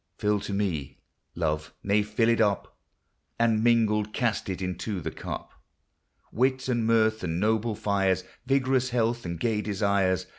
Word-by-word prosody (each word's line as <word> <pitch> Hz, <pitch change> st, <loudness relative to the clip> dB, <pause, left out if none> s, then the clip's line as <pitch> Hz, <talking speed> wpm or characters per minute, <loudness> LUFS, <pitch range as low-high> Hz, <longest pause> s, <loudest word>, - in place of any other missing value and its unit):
Fill 105 Hz, 0 st, +1 dB
to 105 Hz, +1 st, -6 dB
me, 95 Hz, -9 st, -2 dB, 0.4 s
Love, 75 Hz, -1 st, -2 dB
nay 100 Hz, +1 st, +3 dB
fill 105 Hz, +2 st, +1 dB
it 115 Hz, 0 st, +3 dB
up; 105 Hz, -2 st, 0 dB, 0.6 s
And, 115 Hz, -2 st, +2 dB
mingled, 105 Hz, -3 st, +2 dB
cast 120 Hz, -4 st, -1 dB
into 95 Hz, +2 st, -3 dB
the 80 Hz, -, -4 dB
cup -, -, -7 dB, 0.8 s
Wit, 130 Hz, +2 st, +1 dB
and 120 Hz, -3 st, 0 dB
mirth, 110 Hz, -2 st, +3 dB
and 85 Hz, -1 st, -1 dB
noble 110 Hz, +2 st, +1 dB
fires, 95 Hz, -3 st, +1 dB, 0.2 s
Vigorous 130 Hz, -1 st, +2 dB
health, 120 Hz, -1 st, 0 dB
and 85 Hz, -1 st, -4 dB
gay 110 Hz, +1 st, 0 dB
desires. 100 Hz, -3 st, +1 dB
105 Hz, 145 wpm, -27 LUFS, 95-115 Hz, 0.8 s, nay